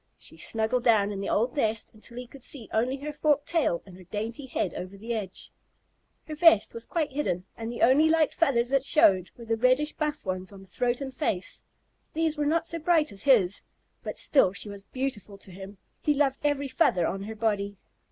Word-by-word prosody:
She - - -11
snuggled 225 +2 0
down 215 -4 +4
in 195 -1 -4
the 200 - -3
old 235 +4 +1
nest 225 -6 0
until 230 +2 -10
he 250 - -5
could 265 +3 -14
see 240 -2 -4
only 245 +5 +1
her 295 +2 -6
forked 295 -1 +1
tail 310 - +1
and 190 -3 -13
her 185 - -13
dainty 225 +8 -5
head 195 -8 -2
over 185 +2 -7
the 230 +4 -4
edge. 200 -5 -6 0.8
Her 310 - -5
vest 305 -8 +5
was 230 0 -8
quite 320 -4 -1
hidden, 185 -11 -2
and 230 0 -5
the 240 - -2
only 290 +6 +5
light 320 -1 +3
feathers 245 -7 +2
that 275 0 +3
showed 200 - +4
were 235 - -10
the 225 0 0
reddish 255 +6 +2
buff 300 -3 -3
ones 185 0 -3
on 195 -1 -12
throat 245 +6 -1
and 265 -1 -5
face; 205 - -3 0.5
these 320 -1 +1
were 295 -1 0
not 330 +2 +1
so 335 0 -2
bright 320 -1 +2
as 195 -1 -6
his, 205 -8 +3 0.4
but - - -6
still 195 -10 +3
she 205 - -4
was 200 0 -8
beautiful 225 -6 -4
to 195 - -11
him. 195 +2 -10 0.2
He 295 - +2
loved 275 -1 +1
every 290 -1 +1
feather 185 - +2
on 195 - -2
her 220 +2 -6
body. 205 -2 -1
235 Hz, 210 wpm, -27 LUFS, 200-290 Hz, 0.8 s, vest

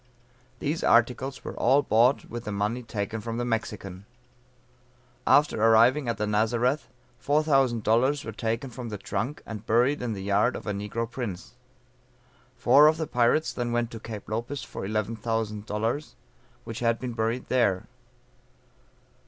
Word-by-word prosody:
These 155 +4 -2
articles 125 +3 +2
were - - -6
all 135 +4 +3
bought 120 +3 +3
with 120 0 -7
the 105 - -3
money 105 +5 -1
taken 110 -1 -4
from 115 +1 -4
the 120 - -1
Mexican. 105 -4 -4 1.2
After 145 -6 +4
arriving 120 +4 +5
at 115 - -1
the 105 - -1
Nazareth, 120 +6 +1 0.4
$4000 135 -3 +2
were 110 - -4
taken 115 +4 -3
from 120 0 -7
the 105 - -5
trunk, 105 +9 -4
and 110 -1 -8
buried 125 +6 +2
in 120 -2 -2
the 95 -2 -6
yard 100 +5 +2
of - - -7
a 105 - -2
negro 105 +3 -3
prince. 110 -7 -6 1.0
Four 150 +2 +6
of 155 +1 +3
the 160 - -2
pirates 125 +4 +2
then 120 -1 -2
went 120 0 0
to 115 - -7
Cape 110 -2 -8
Lopez 120 +6 -4
for 95 - -6
$11,000, 110 +3 -2 0.5
which 115 0 -6
had 115 -1 +1
been 125 0 -5
buried 115 +2 -2
there. 100 -8 +1
115 Hz, 150 wpm, -27 LUFS, 110-125 Hz, 1.2 s, Four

